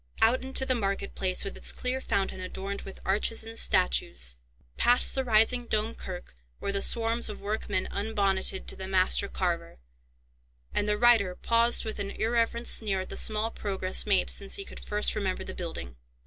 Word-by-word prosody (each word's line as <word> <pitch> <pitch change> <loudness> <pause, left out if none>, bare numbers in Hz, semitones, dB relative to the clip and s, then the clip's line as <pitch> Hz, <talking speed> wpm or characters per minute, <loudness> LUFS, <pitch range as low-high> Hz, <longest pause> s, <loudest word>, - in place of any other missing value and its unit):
Out 230 +3 +4
into 265 0 +2
the 260 - +3
market 200 -4 -2
place, 185 -1 -1
with 195 - -5
its - - 0
clear 255 +1 -2
fountain 195 -5 -1
adorned 195 +2 -5
with 195 - -10
arches 210 +4 0
and 225 0 -8
statues, - - +1 0.4
past 245 +1 +3
the 265 - 0
rising 235 +1 +3
Dome 220 +1 0
Kirk, 180 - -8 0.2
where - - -3
the 200 0 -1
swarms 230 +1 +2
of 210 - -7
workmen 205 -2 -2
unbonneted 200 -2 +1
to - - +1
the 190 - -6
master 190 +1 +2
carver, 170 -3 -3 1.0
and 205 - 0
the 210 - +1
reiter 220 -6 +4
paused 230 +3 +2
with 220 -1 -5
an 200 0 -3
irreverent 235 +2 0
sneer 195 -4 +2
at 185 - -8
the - - -6
small 220 +1 +1
progress 190 -2 -1
made 195 -3 +3
since 200 -1 -3
he 395 - -3
could - - -10
first 210 0 0
remember 195 -3 -2
the 190 - -7
building. 65 - -7
205 Hz, 180 wpm, -28 LUFS, 190-230 Hz, 1.0 s, Out